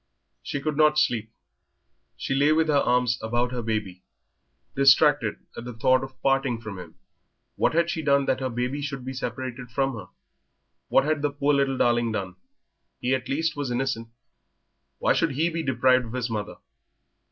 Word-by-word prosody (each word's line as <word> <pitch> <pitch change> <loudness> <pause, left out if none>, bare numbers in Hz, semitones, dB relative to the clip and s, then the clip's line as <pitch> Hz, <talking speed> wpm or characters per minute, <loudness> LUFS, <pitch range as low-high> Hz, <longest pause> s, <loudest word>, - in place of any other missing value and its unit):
She 145 - -4
could 150 +1 -3
not 150 -1 +4
sleep; 115 -7 +1 0.9
she - - -3
lay 140 +3 +3
with 160 0 +2
her - - +3
arms 125 -2 +1
about 120 +2 -1
her 125 -1 -3
baby, 105 -5 -3 0.7
distracted 135 -3 +4 0.2
at - - -7
the 125 0 -7
thought 130 +3 +3
of 135 -1 -10
parting 135 -3 +1
from 110 -4 -8
him. 85 -3 -11 0.6
What - - +1
had 170 0 +3
she 160 - -3
done 140 -2 +2
that 130 - 0
her 130 -1 -2
baby 125 +4 -2
should 140 -3 -5
be 130 - -4
separated 125 -1 -5
from 135 +3 0
her? 105 -6 -8 0.8
What - - +4
had 155 -1 0
the 145 - +1
poor 145 +1 0
little 135 -1 +1
darling 120 -2 +2
done? 95 -4 -4 0.6
He 125 +1 0
at 130 -1 -2
least 160 +4 0
was 145 -3 -3
innocent; 120 -2 -2 0.9
why - - +2
should 165 -4 +1
he 160 +5 +1
be 165 0 -2
deprived 130 -2 +2
of 115 - -9
his 125 -2 -2
mother? 105 -1 -4
130 Hz, 180 wpm, -25 LUFS, 120-140 Hz, 0.9 s, not